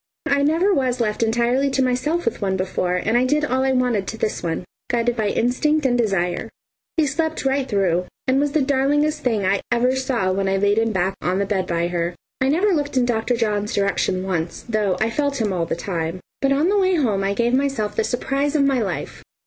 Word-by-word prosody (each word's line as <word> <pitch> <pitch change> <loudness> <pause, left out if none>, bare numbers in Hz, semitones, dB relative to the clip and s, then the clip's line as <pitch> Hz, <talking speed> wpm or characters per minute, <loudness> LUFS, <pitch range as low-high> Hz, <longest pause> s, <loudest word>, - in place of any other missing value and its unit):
I 280 0 +2
never 330 +7 +3
was 255 -5 0
left 215 -2 -1
entirely 240 +4 +2
to 265 0 +1
myself 260 +7 0
with 230 - -2
one 190 -1 0
before, 185 -1 -1
and 220 +5 0
I 245 - +4
did 295 +4 +1
all 260 -1 0
I 265 - +2
wanted 245 -7 +1
to 225 - -5
this 215 - -2
one, 165 0 -2 0.3
guided 240 0 +1
by 220 -2 0
instinct 275 +8 +1
and 250 -2 +3
desire. 195 -7 0 0.5
He 315 - +4
slept 315 +1 -2
right 270 -1 0
through 185 -4 +1 0.2
and 260 +1 +3
was 290 0 0
the 310 - +2
darlingest 290 +3 +1
thing 220 -7 0
I 195 +1 +1
ever 250 +2 +2
saw 255 -8 0
when 195 +1 0
I 195 - +1
laid 205 +2 +2
him 225 0 +1
back 190 -1 0
on 180 +1 0
the 200 - +1
bed 195 -2 -1
by 170 0 0
her. 175 0 -2 0.3
I 260 - +3
never 370 +7 +2
looked 290 -4 -1
in 250 - +3
Dr. 240 0 0
John's 210 -2 -1
direction 200 -2 0
once, 175 -3 -3
though 210 -5 0
I 220 +1 +1
felt 285 +1 -1
him 210 -4 0
all 170 -2 -1
the - - -1
time. 170 -1 -3 0.2
But 275 - +2
on 290 +6 +2
the 410 0 +3
way 375 -1 +3
home 220 - +1
I 200 +1 0
gave 235 +2 +1
myself 265 -6 0
the 220 - +1
surprise 275 +5 -1
of 290 - +4
my 270 -3 +2
life! 200 - -4
240 Hz, 230 wpm, -21 LUFS, 195-275 Hz, 0.5 s, I